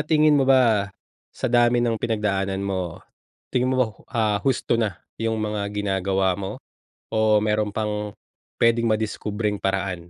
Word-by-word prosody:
tingin 155 Hz, -1 st, +4 dB
mo 135 Hz, -, +3 dB
ba 115 Hz, -7 st, +4 dB, 0.4 s
sa -, -, -3 dB
dami 120 Hz, 0 st, +4 dB
ng 115 Hz, -1 st, +1 dB
pinagdaanan 100 Hz, -4 st, -1 dB
mo, 95 Hz, -4 st, -3 dB, 0.5 s
tingin 125 Hz, 0 st, +1 dB
mo -, -, 0 dB
ba -, -, +5 dB
ho 105 Hz, -, -16 dB
ah 110 Hz, -4 st, +1 dB
husto 130 Hz, -2 st, +1 dB
na 105 Hz, -5 st, -1 dB, 0.2 s
yung 115 Hz, 0 st, 0 dB
mga 105 Hz, -1 st, -2 dB
ginagawa 95 Hz, -2 st, 0 dB
mo? 95 Hz, -1 st, -4 dB, 0.6 s
O 110 Hz, -1 st, +4 dB
meron 105 Hz, 0 st, +1 dB
pang 105 Hz, -1 st, -3 dB, 0.5 s
pwedeng 115 Hz, 0 st, +3 dB
madiskubreng 105 Hz, -1 st, -1 dB
paraan 95 Hz, -3 st, -2 dB
105 Hz, 150 wpm, -23 LUFS, 100-115 Hz, 0.6 s, ba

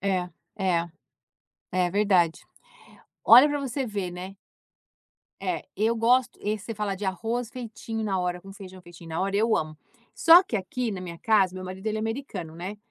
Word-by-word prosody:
É, 185 Hz, -2 st, 0 dB, 0.3 s
é. 175 Hz, -4 st, 0 dB, 0.8 s
É 180 Hz, -1 st, +1 dB
verdade. 190 Hz, -5 st, +2 dB, 0.9 s
Olha 250 Hz, +5 st, +9 dB
pra 290 Hz, 0 st, -1 dB
você 270 Hz, 0 st, -3 dB
ver, 200 Hz, -5 st, -3 dB
né. 185 Hz, +2 st, -8 dB, 1.1 s
É. -, -, -2 dB
Eu 220 Hz, +3 st, +2 dB
gosto 240 Hz, +2 st, +2 dB
esse, 210 Hz, 0 st, -2 dB
você 225 Hz, -, -4 dB
fala 205 Hz, -2 st, -2 dB
de 205 Hz, -, -6 dB
arroz 225 Hz, +5 st, -2 dB
feitinho 225 Hz, -2 st, -6 dB
na 195 Hz, -3 st, -1 dB
hora, 180 Hz, 0 st, -2 dB
com 195 Hz, +2 st, -12 dB
feijão 190 Hz, -2 st, -11 dB
feitinho 170 Hz, -1 st, -13 dB
na 160 Hz, -, -2 dB
hora, 195 Hz, +1 st, 0 dB
eu 225 Hz, +2 st, +3 dB
amo. 155 Hz, 0 st, -3 dB, 0.4 s
Só 335 Hz, +3 st, +8 dB
que 230 Hz, -, -3 dB
aqui, 225 Hz, +5 st, -3 dB
na 190 Hz, -, -5 dB
minha 170 Hz, -2 st, -7 dB
casa, 205 Hz, -5 st, +3 dB
o -, -, -12 dB
meu 185 Hz, -, -6 dB
marido, 185 Hz, +3 st, -8 dB
ele 215 Hz, 0 st, 0 dB
é -, -, -2 dB
americano, 220 Hz, -, -5 dB
né. 190 Hz, +4 st, -6 dB
200 Hz, 185 wpm, -26 LUFS, 180-225 Hz, 1.1 s, Olha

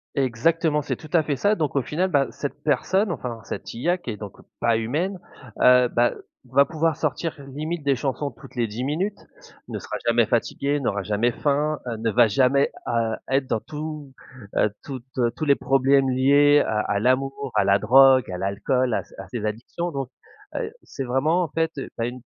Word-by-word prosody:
Exactement 150 Hz, +5 st, +1 dB
c'est -, -, -3 dB
tout 155 Hz, -, -13 dB
à 170 Hz, -, +5 dB
fait 145 Hz, -2 st, -2 dB
ça 205 Hz, +9 st, +2 dB
donc 155 Hz, -9 st, -1 dB
au 140 Hz, -, +2 dB
final, 180 Hz, +8 st, -1 dB
bah, 140 Hz, -5 st, +2 dB
cette 145 Hz, -, -6 dB
personne, 180 Hz, +8 st, +1 dB
enfin, 120 Hz, -6 st, -5 dB
cette -, -, -6 dB
IA 175 Hz, +10 st, +1 dB
qui -, -, -8 dB
est 105 Hz, -, -4 dB
donc 105 Hz, -2 st, -9 dB, 0.2 s
pas 115 Hz, -1 st, +2 dB
humaine, 155 Hz, -, -1 dB, 0.4 s
heu, 125 Hz, 0 st, +6 dB
bah, 120 Hz, 0 st, +2 dB, 0.3 s
va 135 Hz, +3 st, +4 dB
pouvoir 160 Hz, 0 st, 0 dB
sortir 165 Hz, -2 st, -2 dB, 0.2 s
limite 155 Hz, +3 st, -4 dB
des 140 Hz, -, +3 dB
chansons 140 Hz, +2 st, -2 dB
toutes 115 Hz, +2 st, -15 dB
les 120 Hz, -, +1 dB
10 110 Hz, +3 st, -5 dB
minutes, 180 Hz, +9 st, -2 dB, 0.5 s
ne -, -, -5 dB
sera -, -, -5 dB
jamais 115 Hz, 0 st, +4 dB
fatiguée, 140 Hz, +5 st, 0 dB
n'aura 100 Hz, -6 st, -1 dB
jamais 105 Hz, +4 st, +1 dB
faim, 150 Hz, +3 st, 0 dB
heu, 115 Hz, -2 st, -4 dB
ne 115 Hz, +1 st, -1 dB
va 115 Hz, +2 st, +5 dB
jamais, 130 Hz, +5 st, +3 dB, 0.2 s
heu, 115 Hz, -1 st, 0 dB
être 135 Hz, 0 st, +2 dB
dans 115 Hz, -, 0 dB
tout, 150 Hz, +1 st, -7 dB, 0.5 s
heu, 105 Hz, -, +3 dB
toutes 130 Hz, -3 st, -7 dB, 0.3 s
tous 155 Hz, -, -3 dB
les 140 Hz, -2 st, +5 dB
problèmes 135 Hz, 0 st, +3 dB
liés 140 Hz, +3 st, +5 dB
à 105 Hz, -, 0 dB
à 100 Hz, -, 0 dB
l'amour, 135 Hz, +3 st, 0 dB
à -, -, +4 dB
la 100 Hz, 0 st, +4 dB
drogue, 130 Hz, +3 st, +6 dB
à 90 Hz, -, -4 dB
l'alcool, 120 Hz, +6 st, 0 dB
à -, -, -1 dB
ses -, -, -19 dB
à -, -, -8 dB
ses 115 Hz, -4 st, -4 dB
addictions 120 Hz, +11 st, -4 dB
donc 135 Hz, -4 st, -4 dB, 0.5 s
heu, 455 Hz, -3 st, -3 dB
c'est 135 Hz, -, -6 dB
vraiment 145 Hz, +8 st, +1 dB
en 165 Hz, -, -4 dB
fait, 165 Hz, 0 st, 0 dB
heu, 135 Hz, -, -4 dB
tu -, -, -5 dB
as -, -, 0 dB
une 125 Hz, +1 st, -7 dB
135 Hz, 205 wpm, -24 LUFS, 120-150 Hz, 0.5 s, heu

